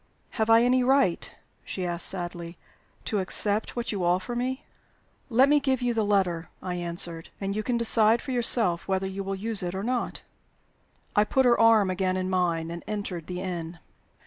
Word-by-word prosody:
"Have 220 -1 -1
I 225 +1 +6
any 250 +1 +3
right," 265 -9 +1 0.3
she 185 - -5
asked, 175 0 +4
sadly, 175 -2 -3 0.5
"to 210 - -1
accept 205 +3 0
what 240 0 -3
you 200 -4 -3
offer 185 +6 0
me?" 255 +2 -3 0.6
"Let 255 +3 +4
me 295 +1 +4
give 265 -3 -1
you 245 -1 +1
the 225 -1 0
letter," 185 -5 0
I 180 - -5
answered, 170 -1 0
"and 195 0 -3
you 215 - -1
can 240 +2 -1
decide 230 -1 +3
for 265 - -7
yourself 225 -7 +2
whether 190 0 -1
you 190 +1 -5
will 195 0 -3
use 215 +1 -1
it 180 0 -4
or 190 - -4
not." 245 +1 -3 0.9
I 210 - +5
put 265 +5 +1
her 240 -1 +4
arm 225 -4 +4
again 185 0 -1
in 185 0 -3
mine, 170 -3 -1
and 170 0 -7
entered 200 -6 -5
the 180 0 -5
inn. 175 -2 -5
195 Hz, 190 wpm, -26 LUFS, 180-235 Hz, 0.9 s, I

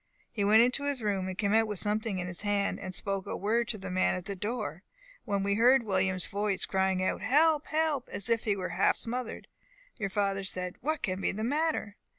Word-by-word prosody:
He 210 -4 -2
went 215 +3 +6
into 250 +3 0
his 280 -5 -2
room, 195 -3 -1
came 200 +1 0
out 225 0 +4
with 210 -2 -3
something 210 +1 -1
in 180 - -3
his 175 -1 -4
hand, 205 -1 0
and 185 -1 -5
spoke 195 0 -2
a - - -3
word 230 +4 +1
to 220 - -2
the 190 -2 -7
man 185 0 +2
at 180 -1 -6
the 200 -1 -4
door, 210 - -4 0.4
when 200 -3 0
we 200 0 +1
heard 245 +4 +5
William's 190 -3 0
voice, 200 -1 -1
crying 190 -1 +1
out, 185 - -1
'Help! 300 - +3
help!' 310 -4 0
as 200 - -1
if 230 -1 +1
he 205 -2 +2
was 185 -2 -4
half - - +3
smothered. 245 0 -3 0.5
Your 200 -4 -2
father 195 0 0
said, 180 -1 -4
'What 310 +4 -2
can 185 0 -1
be - - +1
the 215 +2 -4
matter? 290 -5 -1
205 Hz, 220 wpm, -30 LUFS, 190-235 Hz, 0.5 s, went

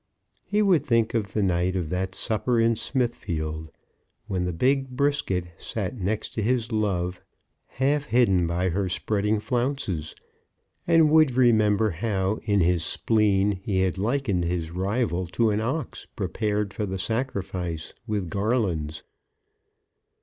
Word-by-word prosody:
He 210 +1 +2
would 180 -8 +4
think 115 -5 +2
of 105 -4 -1
the 105 - +1
night 90 0 +1
of 85 -4 -2
that 95 +2 -2
supper 115 +1 0
in 115 0 +3
Smithfield, 80 - -2 0.6
when 95 -4 -2
the 90 - -1
big 135 +9 +1
Brisket 125 -9 0
sat 105 +1 -4
next 105 0 -2
to 110 - -2
his 120 +1 0
love, 90 -5 -1 0.5
half 140 +3 0
hidden 105 -8 +3
by 90 +2 0
her 95 +2 -1
spreading 105 +3 0
flounces, 120 - -2 0.7
and 160 -2 +5
would 155 -4 +5
remember 110 -4 +4
how, 95 +2 -1
in 100 -2 +2
his 85 -1 +2
spleen, 105 +1 +2
he 95 0 -1
had 95 0 0
likened 110 -4 0
his 85 -2 -2
rival 95 0 -1
to 110 +6 +1
an 105 +1 0
ox 135 +8 -3
prepared 105 +1 -1
for 105 - -3
the 95 0 -3
sacrifice 95 -6 -3
with 105 -4 -1
garlands. 95 -6 -1
105 Hz, 140 wpm, -25 LUFS, 90-120 Hz, 0.7 s, and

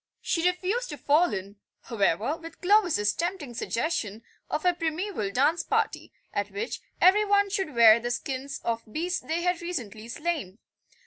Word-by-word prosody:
She 335 +1 +1
refused 390 +7 -2
to 295 - -6
fall 295 +4 +3
in, 200 0 -5 0.2
however, 220 - 0
with 330 +1 -11
Clovis's 355 - +3
tempting 340 -7 -3
suggestion 230 -4 -2 0.3
of 305 - -2
a 360 - +5
primeval 330 - -2
dance 290 +10 +2
party, - - -1 0.2
at - - -1
which 430 +3 -4 0.2
every 390 +4 +6
one 405 -1 +2
should 380 -8 -2
wear 230 -1 +8
the 240 +1 -3
skins 270 +2 -4
of 230 0 -1
beasts 350 +7 -1
they 330 +2 -3
had 355 -1 0
recently 230 - -5
slain. 280 - -3
315 Hz, 155 wpm, -27 LUFS, 235-360 Hz, 0.3 s, wear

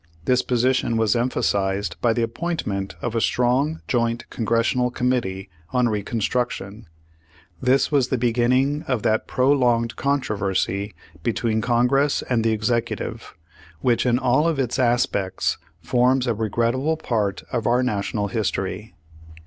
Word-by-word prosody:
This 125 0 +3
position 125 -1 +1
was 110 0 +2
emphasized 100 -6 0
by 120 - +3
the 115 +1 0
appointment 115 - -3
of 120 - -2
a 115 - 0
strong 130 +8 +1
joint 115 -1 0
Congressional 115 +2 +1
Committee 120 -7 -1 0.3
on 125 -2 +3
Re 105 -2 -1
construction. 110 -1 -3 0.7
This 130 +3 +2
was 140 -4 +3
the 130 - 0
beginning 125 +5 +2
of 125 -5 -1
that 110 0 +1
prolonged 125 -3 +2
controversy 100 -7 -1 0.3
between 110 +2 0
Congress 125 +5 +2
and 120 -3 +1
the 115 - +2
Executive, 115 -2 -2 0.5
which 120 0 +2
in 120 0 +3
all 130 +4 +2
of 165 -3 0
its 125 -2 -1
aspects 120 -6 0 0.2
forms 125 +5 +2
a 120 - +1
regrettable 115 +8 0
part 105 -8 -1
of 115 -3 -1
our 125 +2 +3
National 105 -3 -1
history. 105 0 -3
120 Hz, 135 wpm, -23 LUFS, 110-125 Hz, 0.7 s, This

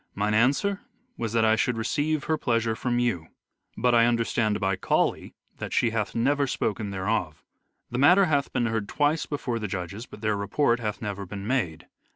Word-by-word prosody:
Mine 105 +1 0
answer 140 - +2 0.3
was 115 -2 -3
that 115 -1 +3
I 110 0 +4
should 115 +2 0
receive 145 +6 0
her 160 +1 +1
pleasure 115 -6 0
from 120 +1 -1
you. 120 -10 0 0.5
But 125 -1 +2
I 115 0 +5
understand 115 -2 +1
by 95 0 +1
Cauley 95 - 0 0.2
that - - -5
she 115 - +2
hath 110 -2 -2
never 140 +4 +2
spoken 110 -4 -2
thereof. 95 -4 -2 0.5
The 120 - -2
matter 180 +8 +6
hath 145 -4 0
been 120 - 0
heard 110 -3 -2
twice 150 +2 +1
before 125 -5 -3
the 105 - -3
judges 95 +4 -5
but 105 - -12
their 110 -1 +1
report 115 +4 +1
hath 105 -2 -4
never 100 -2 -4
been 100 +1 -6
made. 105 -11 -1
115 Hz, 190 wpm, -26 LUFS, 105-130 Hz, 0.5 s, matter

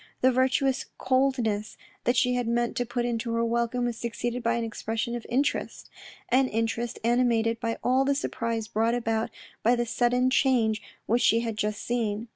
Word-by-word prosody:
The 260 - +5
virtuous 260 +1 +1
coldness 250 -5 0 0.3
that 245 +1 +2
she 250 +1 +3
had 245 -1 -1
meant 235 0 0
to 245 - -1
put 240 0 -1
into 235 -1 -2
her 230 0 +1
welcome 235 +1 0
was 240 -2 -2
succeeded 240 +1 -3
by 235 0 +1
an 235 - -1
expression 225 +1 -3
of 240 - -6
interest 265 +4 -1 0.2
— - - -19
an 260 +2 +4
interest 230 +1 -2
animated 230 -1 +2
by 230 -1 -2
all 260 +2 +3
the 280 +1 +1
surprise 230 -5 -2
brought 225 +2 +1
about 225 -2 -1 0.3
by 235 +3 +4
the 240 0 0
sudden 245 +2 +2
change 230 -6 +2 0.2
which 235 +3 +2
she 230 +1 +4
had 230 -2 -3
just 210 0 -2
seen. 230 -2 -2
235 Hz, 185 wpm, -27 LUFS, 225-250 Hz, 0.3 s, The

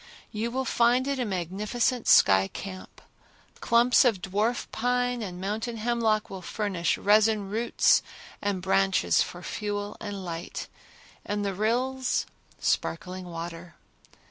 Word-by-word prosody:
You 220 +1 -2
will 260 +2 -2
find 240 +2 +3
it 280 -1 -1
a 250 - 0
magnificent 210 +6 -1
sky 95 -1 +6
camp. 185 - -9 0.6
Clumps 240 +1 +4
of 230 -7 +2
dwarf 210 +6 -1
pine 245 +1 0
and 180 -4 -6
mountain 220 +5 -3
hemlock 225 -1 +1
will 190 -1 -8
furnish 190 -3 -1
resin 210 -1 +3
roots 230 +3 +3 0.4
and 200 -3 -2
branches 195 0 +3
for 175 +1 -4
fuel 205 -1 -4
and 200 -3 -6
light, 170 0 -5 0.6
and 205 0 -2
the 200 - -1
rills, 250 +6 0 0.3
sparkling 180 +2 -2
water. 170 0 -7
210 Hz, 125 wpm, -27 LUFS, 185-235 Hz, 0.6 s, sky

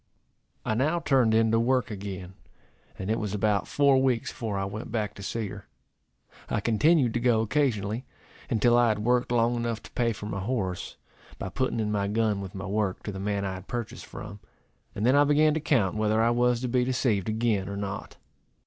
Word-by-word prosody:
I - - +1
now 150 +9 +1
turned 130 -8 +3
in 110 0 +3
to 115 - +3
work 125 -1 +1
again; 95 -2 -6 0.6
and 95 +3 -3
it 110 - 0
was 105 -1 -3
about 105 -1 +1
four 140 -2 +4
weeks 125 -3 +1
before 110 -5 -4
I 95 - -1
went 105 +4 -6
back 110 -3 -1
to - - -11
see 110 +2 -3
her. 105 -2 -10 0.8
I - - 0
continued 120 +4 +3
to 120 - 0
go 120 -2 +3
occasionally, 115 -2 0 0.4
until 120 0 +3
I 120 0 +5
had 105 -1 0
worked 125 0 +2
long 120 0 +2
enough 115 -1 -2
to - - -12
pay 120 -1 +1
for 105 -1 -7
my 100 -2 -3
horse, 95 -4 -3 0.4
by 95 - -5
putting 130 +1 -1
in 105 -1 -1
my 100 -1 0
gun 105 -1 0
with 95 -1 -8
my 95 +1 -5
work, 100 -1 -1
to 105 - -4
the 95 - -6
man 100 0 -1
I 95 - -2
had 95 +1 -9
purchased 120 -2 -5
from; 105 -4 -9 0.6
and 105 - -1
then 130 +3 +5
I 145 - +6
began 150 +1 +4
to 155 - 0
count 120 -11 +1
whether 110 0 +1
I 115 +1 +4
was 120 0 +2
to 130 - -1
be 125 +1 +2
deceived 120 -6 0
again 110 -3 0
or 100 - -4
not. 100 -1 -5
110 Hz, 210 wpm, -27 LUFS, 100-125 Hz, 0.8 s, I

